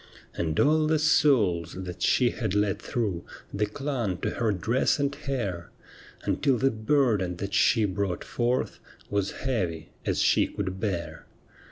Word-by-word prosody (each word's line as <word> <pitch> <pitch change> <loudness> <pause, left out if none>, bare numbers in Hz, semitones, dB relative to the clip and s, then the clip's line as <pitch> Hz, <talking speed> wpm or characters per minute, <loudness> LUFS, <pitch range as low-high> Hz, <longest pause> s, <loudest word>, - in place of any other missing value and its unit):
And 80 -2 -2
all 155 +1 +4
the 155 0 +3
souls 115 - +3
that 90 -2 -7
she 125 -2 +3
had 110 -5 -3
let 105 -1 +1
through 100 -8 -2 0.3
They 105 +1 0
clung 120 -5 -2
to - - -1
her 115 -3 0
dress 110 +7 +1
and 140 -1 0
hair. 120 - -4 0.5
Until 135 -3 +1
the 135 +4 +2
burden 110 -6 +1
that 100 +3 -5
she 110 0 +4
brought 95 -2 -2
forth 120 +1 -1 0.3
Was 100 -1 0 0.2
heavy 90 - -2
as - - -1
she - - +4
could 95 -2 -4
bear. 85 -7 -3
105 Hz, 150 wpm, -27 LUFS, 90-130 Hz, 0.5 s, all